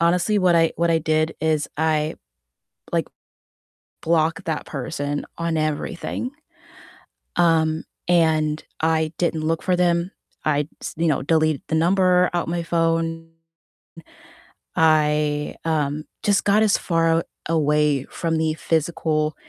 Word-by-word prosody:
honestly, 180 +5 +2
what 180 -2 +4
I 165 -1 +3
what 170 0 +1
I 165 - +3
did 155 0 0
is 155 -1 0
I 155 0 0 0.8
like - - 0 0.9
block 165 +3 +1
that 160 -3 -3
person 145 +1 -4
on 165 -1 -1
everything, 155 - -3 1.0
um, 160 -2 +2 0.2
and 155 -3 +2 0.2
I 160 -1 +1
didn't 165 -3 0
look 165 0 0
for 180 -1 +1
them, 175 +1 +1 0.3
I 145 -1 +2 0.2
s - - -5
you 165 +2 0
know, 145 - +1
deleted 155 0 +2
the - - -1
number 180 +1 +3
out 175 -1 -1
my 170 0 -1
phone; 165 -1 0 1.5
I, 150 -2 +2
um, 150 -1 -1 0.2
just 205 -1 +2
got 205 +2 +4
as 210 -2 +3
far 165 -1 +2
aw - - -1 0.3
away 150 -3 +2
from 165 -1 -2
the 160 0 +1
physical, 155 -1 0
160 Hz, 130 wpm, -22 LUFS, 155-170 Hz, 1.5 s, what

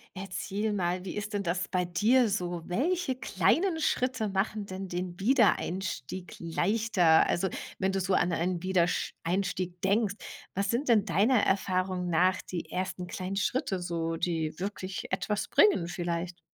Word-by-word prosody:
Erzähl 195 +3 -3
mal, 180 -1 -1
wie 180 - -5
ist 210 +1 -4
denn 200 -1 -1
das 175 0 -1
bei 180 -1 0
dir 220 +8 +3
so? 175 -4 -2
Welche 290 - 0
kleinen 300 - +1
Schritte 255 -6 0
machen 200 +2 -1
denn 190 0 -6
den 180 +1 -4
Wiedereinstieg 190 - 0
leichter? 175 0 +3
Also 190 +2 +1 0.3
wenn 190 +1 +1
du 195 - 0
so 185 +1 0
an 175 -1 +2
einen 175 +1 -1
Wiedersch 185 -2 +1
einstieg 180 0 -2
denkst, 200 +1 +2 0.4
was 195 +1 0
sind 245 +4 -1
denn 215 -4 +5
deiner 215 +5 +3
Erfahrung 185 -1 0
nach 180 +3 +3
die 175 -3 -6
ersten 185 0 -3
kleinen 185 +2 -4
Schritte 205 -1 0
so, 165 -2 -2
die 160 -2 -2
wirklich 190 -1 -5
etwas 210 -1 -1
bringen 190 - +4
vielleicht? 175 0 -3
185 Hz, 150 wpm, -29 LUFS, 175-210 Hz, 0.4 s, denn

